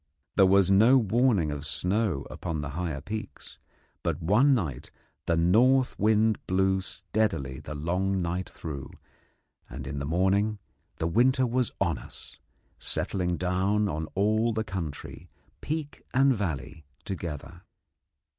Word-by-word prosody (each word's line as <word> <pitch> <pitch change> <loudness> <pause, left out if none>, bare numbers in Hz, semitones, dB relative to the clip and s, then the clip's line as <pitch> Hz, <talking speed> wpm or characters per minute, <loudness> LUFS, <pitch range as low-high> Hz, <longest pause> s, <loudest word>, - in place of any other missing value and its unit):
There 95 -2 +6
was 95 0 +4
no 110 +7 +6
warning 110 - +2
of 75 -1 -5
snow 90 -1 -1
upon 80 -3 -4
the 75 - -4
higher 80 -3 -3
peaks, 110 +5 -7 0.4
but 85 -3 -1
one 110 - +4
night 75 - -3 0.4
the 85 - +2
north 125 +10 +4
wind 110 +1 +3
blew 95 +1 +2
steadily 95 -10 -2
the 75 - -7
long 90 +6 0
night 90 +1 -2
through, 70 -5 -7 0.8
and 65 +2 -7
in 70 +1 -4
the 70 - -3
morning 95 +6 +2 0.4
the - - -3
winter 130 +9 +3
was 125 0 0
on 85 -4 0
us, - - -13 0.4
settling 90 -2 -2
down 95 +3 +1
on 80 -3 -3
all 110 +4 +2
the 110 0 -1
country, 90 -8 -6 0.3
peak 155 -1 -4
and 135 +1 +5
valley, 80 - -4 0.2
together. 85 -2 -6
95 Hz, 135 wpm, -28 LUFS, 80-110 Hz, 0.8 s, There